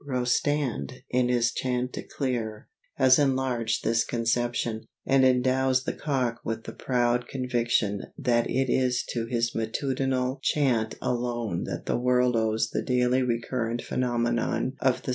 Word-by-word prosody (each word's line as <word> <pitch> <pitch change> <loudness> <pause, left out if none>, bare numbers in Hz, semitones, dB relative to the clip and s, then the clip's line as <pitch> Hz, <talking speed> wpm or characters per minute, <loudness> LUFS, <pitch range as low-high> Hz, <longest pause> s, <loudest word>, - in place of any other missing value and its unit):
Rostand, 130 - -1
in 125 0 +2
his 120 -1 +2
"Chantecler," 125 -3 -3 0.3
has 130 -1 +5
enlarged 130 -5 0
this 115 +1 +2
conception, 120 -1 -1 0.2
and 135 0 +4
endows 130 0 +3
the - - -2
cock 130 -5 -1
with 115 0 -3
the - - -7
proud 120 -1 0
conviction 120 -5 0
that 120 -5 +1
it 130 +1 +1
is 125 0 +1
to 115 -1 -2
his 115 -1 0
matutinal 130 +3 -1
chant 125 -7 +1
alone 120 -6 -1
that - - -5
the - - 0
world 125 0 +2
owes 110 0 +1
the - - -1
daily 125 0 +2
recurrent 120 -1 -1
phenomenon 120 0 0
of 130 -2 +1
the - - -17
sunrise. - - -3
125 Hz, 140 wpm, -27 LUFS, 115-130 Hz, 0.3 s, has